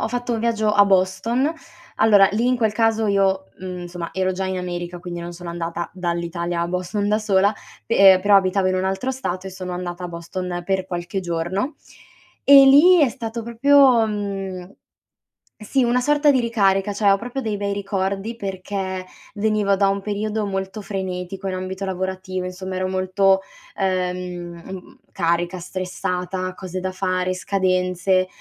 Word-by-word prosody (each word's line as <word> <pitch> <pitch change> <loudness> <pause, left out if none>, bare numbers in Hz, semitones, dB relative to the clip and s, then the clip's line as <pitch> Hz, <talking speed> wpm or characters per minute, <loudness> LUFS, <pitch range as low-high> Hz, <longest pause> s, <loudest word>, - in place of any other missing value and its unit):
ho - - -1
fatto 245 0 -2
un 230 - -1
viaggio 220 -2 +1
a 205 -1 +6
Boston: 195 - +1 0.4
allora 205 -3 +6
lì, 230 +3 +1
in 255 - +3
quel 220 -3 +1
caso 225 0 +1
io, 195 -1 +2
mhmm, 185 -1 -6
insomma 175 -1 -6
ero 185 0 0
già 190 +1 -3
in 190 - -2
America, 175 -1 -5
quindi 175 -1 -6
non 170 0 -6
sono 175 0 -8
andata 170 0 -4
dall'Italia 170 -1 -3
a 170 - -2
Boston 185 +3 -2
da 210 - +2
sola, 205 -1 +2 0.3
pe 195 -4 +6
però 200 0 +6
abitavo 190 0 +2
in 185 - 0
un 185 - -1
altro 195 +8 -1
stato 190 -8 -4
e - - -5
sono 185 -1 -6
andata 180 0 -5
a 180 - -4
Boston 175 +1 -5
per 190 0 -1
qualche 175 +1 -4
giorno, 175 - -2 0.7
e 280 - +7
lì 325 +7 +7
è 275 - +4
stato 230 -2 -5
proprio, 245 0 +4
mhmm, 195 -3 -4 0.9
sì, 250 +5 0
una 245 +1 +2
sorta 295 +2 +4
di 260 -3 +2
ricarica, 205 -4 +1
cioè 205 0 +2
ho 195 - +4
proprio 245 +5 -5
dei 220 -4 -2
bei 200 0 -2
ricordi 200 +2 -2
perché 190 -2 -4 0.3
venivo 210 -1 +1
da 195 0 +3
un 195 0 0
periodo 210 +1 -2
molto 195 +1 -4
frenetico 190 -1 -5
in 190 - -2
ambito 185 +1 -4
lavorativo, 185 0 -3
insomma 185 +1 -6
ero 185 0 -1
molto, 190 +1 +2 0.4
ehm, 180 -1 -4 0.2
carica, 175 +1 0
stressata, 185 0 -4
cose 185 0 -6
da 185 0 -2
fare, 185 -1 -1
scadenze, 185 0 +1
190 Hz, 165 wpm, -22 LUFS, 180-210 Hz, 0.9 s, e